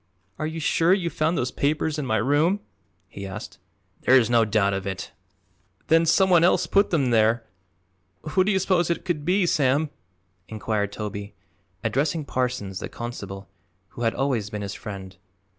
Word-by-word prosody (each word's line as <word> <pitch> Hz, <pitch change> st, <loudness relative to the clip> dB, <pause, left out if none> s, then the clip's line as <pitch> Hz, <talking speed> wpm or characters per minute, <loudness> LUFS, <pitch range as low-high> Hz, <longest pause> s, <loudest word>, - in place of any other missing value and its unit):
"Are 155 Hz, -, -1 dB
you 160 Hz, +1 st, -5 dB
sure 165 Hz, +3 st, +3 dB
you 170 Hz, -4 st, -2 dB
found 160 Hz, +2 st, 0 dB
those 125 Hz, -, -1 dB
papers 150 Hz, +1 st, 0 dB
in 140 Hz, -, -3 dB
my 110 Hz, -, +1 dB
room?" 150 Hz, -, +2 dB, 0.5 s
he 100 Hz, +1 st, -8 dB
asked. 105 Hz, +3 st, -8 dB, 0.4 s
"There 130 Hz, -, +5 dB
is 120 Hz, -2 st, +2 dB
no 115 Hz, -1 st, +5 dB
doubt 105 Hz, -2 st, +2 dB
of 95 Hz, 0 st, -3 dB
it." 95 Hz, +1 st, -5 dB, 0.8 s
"Then 165 Hz, 0 st, +4 dB
some 190 Hz, +4 st, +4 dB
one 175 Hz, -3 st, +5 dB
else 180 Hz, 0 st, +4 dB
put 200 Hz, +4 st, +3 dB
them 140 Hz, -7 st, +1 dB
there. 115 Hz, +1 st, +3 dB, 0.8 s
Who 185 Hz, +4 st, +3 dB
do 205 Hz, -, +1 dB
you 195 Hz, -, +2 dB
suppose 185 Hz, -3 st, +1 dB
it 170 Hz, -, -2 dB
could 160 Hz, -5 st, -2 dB
be, 185 Hz, +2 st, +3 dB
Sam?" 145 Hz, -1 st, +2 dB, 0.6 s
inquired 110 Hz, -2 st, -2 dB
Toby, 100 Hz, -1 st, -6 dB, 0.5 s
addressing 150 Hz, +3 st, 0 dB
Parsons, 125 Hz, -8 st, -2 dB
the -, -, -6 dB
constable, 100 Hz, -5 st, -7 dB, 0.4 s
who -, -, -10 dB
had 115 Hz, -1 st, +1 dB
always 125 Hz, -6 st, -1 dB
been 105 Hz, -2 st, -5 dB
his 100 Hz, 0 st, -4 dB
friend. 95 Hz, -2 st, -8 dB
130 Hz, 175 wpm, -24 LUFS, 105-165 Hz, 0.8 s, There